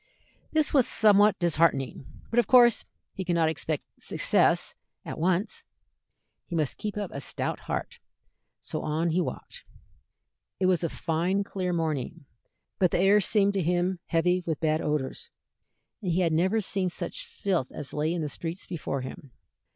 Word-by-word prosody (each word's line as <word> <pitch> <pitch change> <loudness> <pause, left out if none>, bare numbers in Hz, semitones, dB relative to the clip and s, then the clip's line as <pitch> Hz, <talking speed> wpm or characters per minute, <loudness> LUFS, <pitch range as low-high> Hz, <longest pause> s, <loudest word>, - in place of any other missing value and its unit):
This 310 -2 +1
was 265 -5 +4
somewhat 210 -1 +5
disheartening, 150 -7 +1 0.2
but 235 - +3
of 235 - +2
course 240 -3 +6 0.3
he 190 - -4
could 175 -1 0
not 165 -2 +3
expect 160 -2 -2 0.2
success - - +2 0.3
at - - -6
once. 185 - 0 0.8
He 170 - -4
must 155 -4 -1
keep 210 -1 -4
up 205 -3 -3
a 140 - -5
stout - - -3
heart, - - -4 0.6
so - - -5
on 160 +2 0
he 180 +3 +2
walked. 485 - -6 1.0
It 190 - +2
was 185 -2 +2
a 170 - 0
fine 175 +7 0
clear 185 -2 -3
morning, 160 -2 -2 0.5
but 185 -3 +4
the - - 0
air 195 +3 +5
seemed 200 +1 +2
to 195 - 0
him 175 +2 0
heavy 180 +2 +2
with 160 -3 -1
bad 155 0 +1
odors, 150 - -2 0.7
and 185 -4 -1
he 175 +3 +2
had 165 -3 +2
never 190 +7 +2
seen 190 -1 0
such - - -5
filth 195 - -2
as 145 - -7
lay 150 +2 0
in 170 -2 -2
the - - -1
streets 165 +4 -5
before 145 -6 -4
him. 130 +2 -8
175 Hz, 165 wpm, -27 LUFS, 160-200 Hz, 1.0 s, course